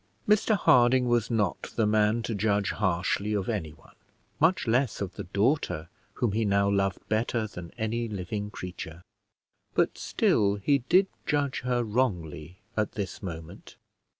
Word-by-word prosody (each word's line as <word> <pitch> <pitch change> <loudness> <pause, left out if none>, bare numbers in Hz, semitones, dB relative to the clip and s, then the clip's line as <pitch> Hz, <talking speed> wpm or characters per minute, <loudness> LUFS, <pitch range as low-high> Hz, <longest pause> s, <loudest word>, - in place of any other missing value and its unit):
Mr 210 +1 +4
Harding 125 -7 +4
was 120 -2 +2
not 105 -7 0
the 115 - +2
man 105 +2 +2
to 115 - -2
judge 100 -1 +1
harshly 100 +2 0
of 100 -3 -1
anyone, 80 -10 -5 0.5
much 165 +4 +3
less 120 -1 +1
of 95 -3 -4
the - - -7
daughter 100 - 0 0.3
whom 120 -4 0
he 110 +3 0
now 100 -1 +2
loved 100 -2 0
better 110 +1 0
than 90 -5 -8
any 115 +1 -1
living 105 0 -4
creature; 90 -3 -8 0.7
but - - +1
still 100 -1 +2
he 140 +8 +2
did 185 +2 +6 0.2
judge 145 -2 0
her 125 -1 0
wrongly 90 - -2 0.2
at 110 -1 -1
this 100 -3 -5
moment. 85 -3 -8
105 Hz, 150 wpm, -28 LUFS, 95-120 Hz, 0.7 s, did